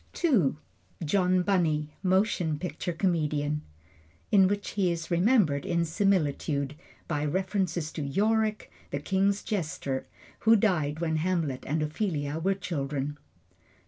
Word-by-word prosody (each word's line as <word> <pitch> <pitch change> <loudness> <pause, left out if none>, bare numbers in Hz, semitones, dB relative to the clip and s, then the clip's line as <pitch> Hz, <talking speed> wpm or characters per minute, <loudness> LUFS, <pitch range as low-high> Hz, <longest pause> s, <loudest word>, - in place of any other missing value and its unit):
II. 220 - +3 0.5
John 180 +2 +2
Bunny, 155 -6 +1
Motion 185 -4 +1
Picture 175 +2 -4
Comedian 150 -4 0 0.7
In 195 -3 +6
which 200 +1 -2
he 190 -4 +1
is 170 0 -4
remembered 175 - +3
in 170 -1 0
similitude, 155 -6 0 0.3
by 150 -2 -1
reference 185 +3 0 0.2
to 155 - -5
Yorick, 215 +8 0 0.2
the 140 - -2
king's 195 +6 +1
jester, 150 -8 -3 0.3
who 225 +1 +5
died 165 -8 +1
when 160 -2 0
Hamlet 160 -6 -1
and 155 +2 0
Ophelia 155 -2 -2
were 195 +4 +1
children. 145 -5 -3
170 Hz, 120 wpm, -28 LUFS, 150-195 Hz, 0.7 s, In